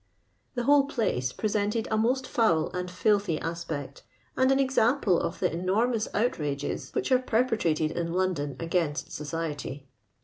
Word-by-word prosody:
The 245 - -1
whole 285 +1 +5
place 200 - -1
presented 210 - -1
a - - +3
most 250 +4 +1
foul 195 -12 +2
and 180 0 -4
filthy 200 -2 +1
aspect, 160 -5 -5 0.3
and 260 +1 +3
an 270 - +3
example 250 -7 +3
of - - -3
the - - +1
enormous 215 +6 +1
outrages 150 - -1
which 390 -9 -1
are 255 - +6
perpetrated 220 -11 +1
in 170 0 -2
London 170 -6 -1
against 165 -3 -1
society. 150 -2 -4
185 Hz, 140 wpm, -28 LUFS, 160-235 Hz, 0.3 s, are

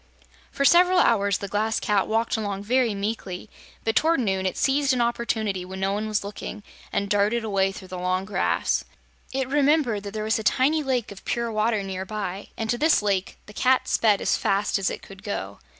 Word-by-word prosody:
For 280 - 0
several 360 +4 +6
hours 200 - +3
the 200 - -6
Glass 215 +3 0
Cat 205 -2 +1
walked 225 +1 0
along 200 -3 -3
very 240 -1 +2
meekly, 200 -2 -4 0.3
but 225 -1 0
toward 325 -1 +3
noon 190 -5 0
it 185 - -3
seized 275 0 +2
an 250 - 0
opportunity 220 -5 -1
when 190 +1 -8
no 195 +1 0
one 210 +2 -2
was 215 -1 -1
looking 205 +1 -7 0.3
and 200 - -1
darted 205 +3 +1
away 195 -3 +1
through 190 -1 -11
the 185 0 -6
long 185 +1 -1
grass. 205 - 0 0.5
It 265 -1 -1
remembered 280 -5 +2
that 200 +1 -8
there 215 - -2
was 220 +1 +1
a - - -5
tiny 280 +7 +2
lake 255 -6 -1
of 195 - -11
pure 235 -1 -2
water 215 -1 +1
near 190 -1 -4
by, 200 -1 -5
and 225 - -2
to 240 - -1
this 305 -6 +4
lake 195 -2 -1
the 210 - -13
Cat 255 +4 +2
sped 210 -3 +3
as - - +2
fast 200 +1 +1
as 190 - +1
it - - -6
could 195 0 -12
go. 100 - -5
215 Hz, 210 wpm, -25 LUFS, 195-235 Hz, 0.5 s, several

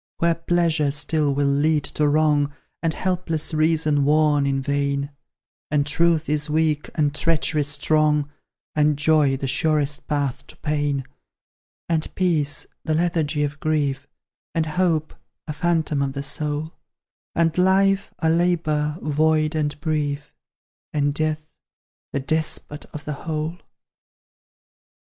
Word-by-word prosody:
Where 170 0 +3
Pleasure 165 -3 +1
still 150 0 +1
will 140 +1 +1
lead 145 +2 +2
to 150 +1 0
wrong, 145 -1 +2 0.3
And 165 - +1
helpless 175 -4 -1
Reason 155 -2 +2
warn 150 -1 +3
in 135 -1 0
vain; 140 0 -1 0.6
And 145 -1 +1
Truth 165 +2 +2
is 150 0 0
weak, 155 -1 +1
and 150 -3 +1
Treachery 155 -1 +1
strong; 150 0 +2 0.5
And 150 -1 +2
Joy 145 -2 +3
the 135 - -3
surest 150 +1 +1
path 145 -4 -2
to - - -11
Pain; 145 -3 -1 0.8
And 160 -2 0
Peace, 155 -6 +1 0.2
the 155 -1 0
lethargy 160 -3 0
of 145 0 -3
Grief; 145 -4 -1 0.5
And 165 -1 +1
Hope, 160 -1 0 0.3
a 150 - -4
phantom 160 -2 0
of 135 -1 -1
the 140 0 -4
soul; 150 +2 -2 0.6
And 165 -1 +2
life, 195 +2 +3
a 160 - 0
labour, 160 -3 +1
void 155 +1 +2
and 150 -2 -2
brief; 150 -2 -2 0.6
And 145 -1 +1
Death, 155 0 -2 0.6
the 140 - -1
despot 150 +1 -2
of 150 0 -10
the 150 - -3
whole! 160 +3 -4
150 Hz, 130 wpm, -23 LUFS, 145-160 Hz, 0.8 s, Where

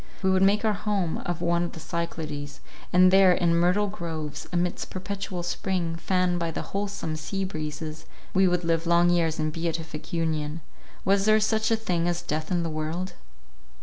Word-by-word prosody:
We 190 - +4
would 190 0 +3
make 200 +3 +4
our 215 - +3
home 200 -5 -1
of 175 -1 -2
one 170 0 +2
of 175 - -2
the - - -8
Cyclades, 155 -3 -4 0.3
and 185 +1 +6
there 190 -1 +7
in 175 -1 +2
myrtle 180 +5 +3
groves, 165 -7 -5
amidst 175 0 -1
perpetual 190 -1 -4
spring, 175 -1 -1
fanned 180 +1 +1
by 170 -1 -1
the 160 - -4
wholesome 200 -5 -3
sea 195 +5 -3
breezes—we 155 +3 -2
would 180 0 +1
live 165 0 +1
long 170 +1 +5
years 165 -2 +2
in 155 0 0
beatific 165 -1 -4
union—Was 165 +4 -2
there 215 0 +5
such 220 0 +1
a 225 - +4
thing 180 -6 -1
as 175 0 -1
death 155 -1 -3
in 175 -2 +1
the 165 - -2
world? 155 +4 -3
175 Hz, 175 wpm, -26 LUFS, 160-190 Hz, 0.3 s, there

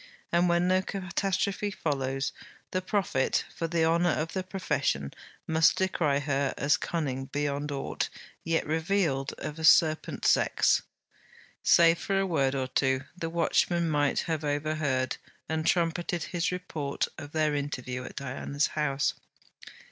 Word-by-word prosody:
And 175 +1 +3
when 175 +1 +3
no 185 0 +3
catastrophe 195 +2 -1
follows, 135 -7 -2 0.4
the 185 - 0
prophet, 185 -8 0
for 165 - -2
the 165 -1 +1
honour 170 +2 +3
of 160 0 -1
the 190 - -1
profession, 145 - -1 0.3
must 160 0 +4
decry 165 -6 +1
her 140 -1 0
as 145 +2 +3
cunning 135 -6 -2
beyond 145 +1 -2
aught 140 -1 -2 0.3
yet 165 0 0
revealed 160 -3 0
of 150 +1 -6
a - - -5
serpent 155 0 +4
sex. - - +3 0.8
Save 165 0 +5
for 195 -1 0
a 195 - +1
word 140 -7 +1
or 130 -1 -1
two, 130 0 +1
the 165 -2 -4
watchman 170 0 +1
might 145 -1 +2
have 160 -2 -2
overheard 145 -3 -1 0.3
and 160 0 -1
trumpeted 170 -1 +1
his 175 -1 -1
report 160 -6 -3
of 145 -1 -8
their 155 -1 +1
interview 130 -3 -3
at - - -9
Diana's 140 +2 -2
house. 140 -2 0
155 Hz, 140 wpm, -28 LUFS, 140-175 Hz, 0.8 s, Save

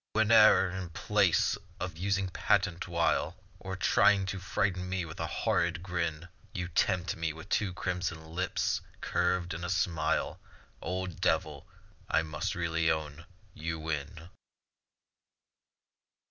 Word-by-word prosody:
Whene'er 110 -2 +6
in 95 -1 -5
place 85 - +2 0.2
of 90 -2 -4
using 95 +2 0
patent 95 -1 +1
wile, 85 0 +1 0.2
Or 95 0 -5
trying 100 +1 +4
to 95 - -5
frighten 90 -1 -1
me 95 -1 -1
with 80 0 -9
horrid 85 - 0
grin, 85 -3 -2 0.3
You 90 0 -3
tempt 90 +1 +1
me 80 -2 -2
with 80 +5 -11
two 100 -3 +1
crimson 90 -3 -3
lips 85 +3 -1 0.2
curved 90 -1 0
in 85 +1 -5
a 90 - -3
smile; 80 -5 0 0.4
Old 90 -1 -4
Devil, - - 0 0.4
I 80 - +3
must 75 -1 -3
really 85 -1 +1
own, 80 0 -2 0.3
you 80 +1 -4
win. 80 +1 -5
90 Hz, 125 wpm, -31 LUFS, 80-95 Hz, 0.4 s, Whene'er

